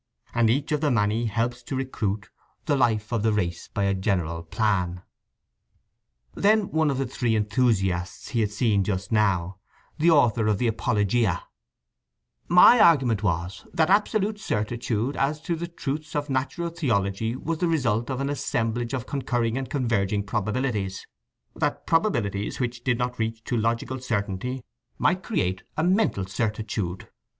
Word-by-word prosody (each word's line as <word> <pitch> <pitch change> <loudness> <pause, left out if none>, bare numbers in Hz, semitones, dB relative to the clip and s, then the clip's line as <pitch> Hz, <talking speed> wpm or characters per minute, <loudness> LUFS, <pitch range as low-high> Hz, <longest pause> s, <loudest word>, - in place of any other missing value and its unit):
And 115 -2 +3
each 140 +6 0
of 150 -1 +1
the 150 - +2
Many 115 -1 +1
helps 120 +3 -1
to 135 - -5
recruit 110 -6 -3 0.3
The 145 - +2
life 115 -3 +1
of 115 - +1
the 110 +1 +2
race 90 -5 -2
by 100 - -1
a 100 0 +2
general 90 -4 -1
plan. 90 -1 -1 1.3
Then 210 -1 +2
one 160 -1 +2
of 135 - -1
the 135 - 0
three 120 -2 -1
enthusiasts 100 -5 0
he 120 - -1
had 105 -2 +2
seen 105 -3 +2
just 95 +1 -3
now, 95 -5 +1 0.4
the 165 +3 +4
author 120 -8 +4
of 105 -2 +2
the 125 - -1
Apologia: 110 -2 +1 1.0
"My 180 +8 +8
argument 130 - +5
was… 90 0 -2
that 160 +2 +3
absolute 210 +1 +2
certitude 120 - -2
as 145 +3 0
to 170 - -2
the 170 +1 -4
truths 150 -2 -5
of 145 -1 -2
natural 145 +6 -1
theology 110 - -1
was 160 +4 -3
the 175 - +1
result 120 -8 0
of 130 -1 -2
an 140 +1 -1
assemblage 120 -2 -1
of 125 -2 -4
concurring 120 -5 -1
and 135 0 -3
converging 105 -7 0
probabilities… 105 -1 -2 0.5
that - - -1
probabilities 115 - 0
which 120 -1 -3
did 125 -2 +1
not 125 0 -2
reach 110 0 -2
to 120 - -2
logical 115 +3 -1
certainty 115 +1 -3 0.3
might 185 +1 +2
create 95 - -1 0.2
a 155 - +1
mental 180 - +2
certitude." 105 -2 -3
115 Hz, 155 wpm, -25 LUFS, 105-140 Hz, 1.3 s, My